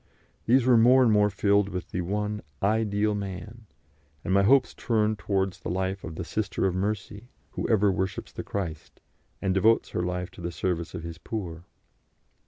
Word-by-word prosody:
These 125 +1 +4
were 125 -2 +6
more 125 +3 +6
and 115 - +4
more 105 -1 +4
filled 100 0 +2
with 90 -2 -6
the 90 - -2
one 105 +3 -2 0.2
Ideal 105 0 +1
Man, 100 +3 -6 0.6
and 95 - 0
my 100 - +5
hopes 130 +5 +4
turned 110 -2 0
towards 95 -1 -1
the - - -6
life 95 +1 -2
of 80 - -7
the 90 - -4
Sister 100 +1 -2
of 95 - +1
Mercy, 105 +3 -3 0.2
who - - -3
ever 105 -3 +4
worships 95 0 -3
the - - -6
Christ, 85 -6 -5 0.4
and 95 -1 +1
devotes 110 +4 +3
her - - -2
life 90 +1 -3
to - - -12
the 85 0 -3
service 85 -1 -2
of 85 - -6
His 85 -1 -7
poor. 85 -7 -6
100 Hz, 185 wpm, -27 LUFS, 90-110 Hz, 0.6 s, were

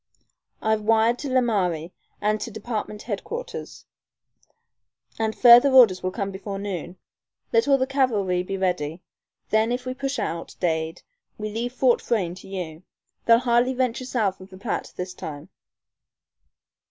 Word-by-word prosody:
I've 220 0 +2
wired 225 +2 +3
to 290 - -4
Laramie 190 -10 0 0.3
and 215 +1 0
to - - -4
Department 215 -1 -5
Headquarters, 420 - -6 1.3
and 220 -1 -1
further 245 +2 +8
orders 240 -9 +6
will 185 - -1
come 195 +1 -3
before 195 +1 -6
noon. 185 -3 -5 0.6
Let 230 +3 +3
all 275 -1 +5
the 260 - +1
cavalry 220 -10 +1
be 195 +2 -4
ready. 180 -3 -2 0.5
Then 220 +2 +3
if 250 +1 -2
we 255 - -2
push 275 +1 -3
out, 170 -6 -4
Dade, 160 -2 -1 0.3
we 215 0 -4
leave 235 +3 -3
Fort 255 -1 +3
Frayne 195 -8 0
to 185 - -12
you. 175 -5 -6 0.5
They'll 230 0 +8
hardly 245 +1 +2
venture 255 0 -1
south 215 -7 -1
of 185 - -12
the 185 - -12
Platte 205 +3 -3
this 180 0 -5
time." 155 +1 -8
215 Hz, 150 wpm, -24 LUFS, 185-245 Hz, 1.3 s, further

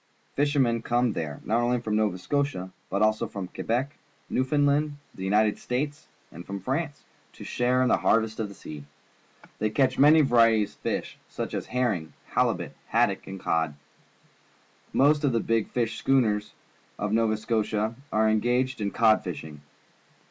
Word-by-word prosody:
Fishermen 135 -5 +2
come 120 -1 +1
there, 75 -3 -4
not 115 +2 +1
only 120 +1 +1
from 110 -2 -2
Nova 105 -4 +1
Scotia, 135 -4 -2 0.2
but 100 - +1
also 110 0 +2
from 100 -3 -6
Que - - -7
bec, 125 +5 0 0.4
Newioundland, 145 +3 +2 0.2
the 95 - -8
United 105 +2 +2
States, 145 +4 -3 0.2
and 85 - -9
from 100 +2 -6
France, 145 - -3 0.3
to - - -11
share 125 +1 +1
in - - +2
the - - +4
harvest 110 0 +1
of 110 -2 -2
the 100 - -11
sea. 75 -5 -9 0.8
Thej^ 110 0 -1
catch 130 -2 +2
mam* 150 +2 +7
varieties 115 -4 +4
of - - -28
fish. - - -3
such - - -5
as - - -3
herring, 110 -11 -1 0.2
halibut, - - 0
haddock, - - +1
and 95 0 -7
cod. 80 -4 0 1.2
Most 145 +2 +3
of 140 -4 +2
the 115 - +2
big 115 -1 0
fishing 115 -2 -1
schooners 110 -6 +1 0.4
of 105 0 -2
Nova 110 -1 +2
Scotia 110 0 -1 0.2
are 110 +1 +3
engaged 120 +3 +1
in 100 - 0
cod 110 +1 +3
fishing. 80 -5 -7
115 Hz, 160 wpm, -26 LUFS, 105-130 Hz, 1.2 s, mam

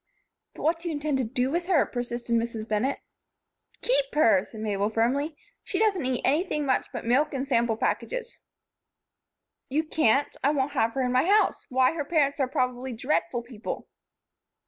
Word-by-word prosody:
"But - - -8
what 330 +2 +2
do 340 - -7
you 320 - -2
intend 290 -2 -1
to - - +1
do 250 +3 -1
with 345 +2 -1
her?" 355 -6 +4
persisted 240 -1 -4
Mrs. 230 -1 -2
Bennett. 225 +6 0 0.8
"Keep - - +2
her," 225 -11 +5
said 220 0 -10
Mabel, 205 -1 0
firmly. 270 +8 0 0.3
"She - - -3
doesn't 410 -7 +2
eat 255 -1 -1
anything 300 +1 +1
much 260 -2 +1
but - - -6
milk 275 +5 +2
and 270 +1 -2
sample 235 -4 +1
packages." - - -2 1.3
"You 300 +4 +1
can't. 290 -4 +2
I 275 - +4
won't 285 -1 0
have 230 -5 +1
her 270 - 0
in 250 - 0
my 255 +4 +3
house. 415 +3 +2
Why! 255 0 +3
Her 320 -3 -2
parents 285 -2 +1
are 265 - +2
probably 255 -1 -2
dreadful 240 -1 -1
people." 235 -3 -6
265 Hz, 175 wpm, -27 LUFS, 235-305 Hz, 1.3 s, her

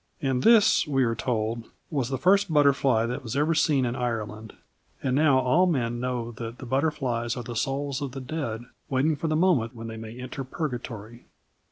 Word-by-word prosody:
"And 130 -2 0
this," 225 - +5
we 135 -3 +2
are 115 -1 +1
told, 115 -1 -2 0.2
"was 135 -6 -1
the 135 - -1
first 195 +2 +3
butterfly 140 -6 +3
that 120 +1 -3
was 120 +1 -4
ever 150 +3 +2
seen 150 -4 +2
in 120 0 -2
Ireland; 110 -3 -4 0.5
and 130 -1 +1
now 145 -2 +4
all 130 +8 +3
men 120 -8 0
know 120 -2 -2
that 115 0 -6
the 130 - -9
butterflies 130 -4 -1
are 120 - -4
the 120 +1 -7
souls 135 +3 -2
of 135 -3 -4
the 135 - -5
dead 125 -5 -4 0.3
waiting 140 +4 +2
for 155 +3 -3
the 155 - +1
moment 150 -9 +2
when 115 0 -8
they 115 0 -6
may 110 +2 -8
enter 130 +2 -5
Purgatory." 120 -5 -6
130 Hz, 195 wpm, -26 LUFS, 115-145 Hz, 0.5 s, this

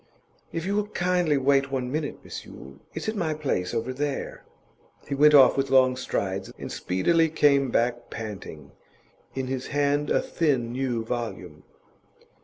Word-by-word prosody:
'If 165 0 -4
you 200 +1 -1
will 210 0 0
kindly 180 -6 +1
wait 135 0 +2
one 130 -2 -2
minute, 150 0 -3
Miss - - -7
Yule. 70 +1 -12 0.2
It's 160 - -4
at 220 - -1
my 165 -6 -1
place 130 -12 -2
over 120 +2 -2
there.' 140 +1 -4 0.6
He 140 - -3
went 150 +2 +6
off 135 -3 +7
with 135 0 0
long 130 -1 +5
strides, 95 -6 -3
and - - -7
speedily 160 - +1
came 140 -3 +3
back 120 0 0
panting, 95 -9 -8 0.6
in 130 -1 -2
his 130 0 -4
hand 145 0 0
a - - +3
thin 135 -8 0
new 125 -3 -2
volume. 120 -1 -5
135 Hz, 160 wpm, -26 LUFS, 120-150 Hz, 0.6 s, off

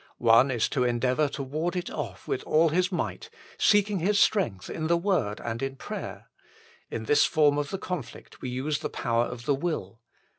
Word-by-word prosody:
One 115 +3 +5
is 120 -4 +1
to 125 - 0
endeavour 125 +4 +1
to 140 0 -5
ward 155 +7 -2
it 180 - -3
off - - -6
with - - -1
all 160 +2 +3
his 180 +4 +1
might, 175 - -3 0.3
seeking 205 -2 +3
his 200 +4 +2
strength 155 - +2
in 160 - -3
the 170 +1 +3
Word 170 - 0
and 115 0 -4
in 135 0 -3
prayer. - - -7 0.6
In 110 - -4
this 145 +6 +4
form 145 -2 +3
of 145 -1 -2
the 195 - -3
conflict 180 -9 -7
we 130 - -4
use 140 +4 -2
the - - -4
power 115 0 0
of 120 -1 -7
the 145 - +3
will. 135 - -3
145 Hz, 195 wpm, -27 LUFS, 120-175 Hz, 0.6 s, One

